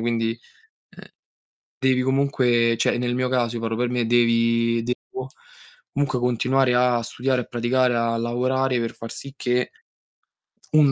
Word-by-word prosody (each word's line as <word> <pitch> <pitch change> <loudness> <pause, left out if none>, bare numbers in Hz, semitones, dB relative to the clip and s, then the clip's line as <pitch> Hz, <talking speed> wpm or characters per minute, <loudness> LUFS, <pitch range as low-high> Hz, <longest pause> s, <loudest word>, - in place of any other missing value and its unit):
quindi, 115 0 -1 0.6
uhm, - - -11 0.8
devi 130 -1 +2
comunque 125 -3 +2
cioè, - - +2
nel 120 0 -1
mio 125 0 0
caso, 120 -2 0
io - - -4
parlo 115 0 -2
per 120 +1 0
me, 120 -2 0
devi 115 0 +2
devo 255 - -5 0.7
comunque 140 -3 -1
continuare 125 +1 +2
a 125 -1 +2
studiare, 125 +3 -1
a - - -9
praticare, 120 +1 +1
a 115 0 0
lavorare 125 +2 0
per 115 -1 -3
far 115 - -8
sì 140 -1 -9
che 125 -1 -1 1.0
un 150 -3 +5
125 Hz, 150 wpm, -23 LUFS, 115-130 Hz, 1.0 s, un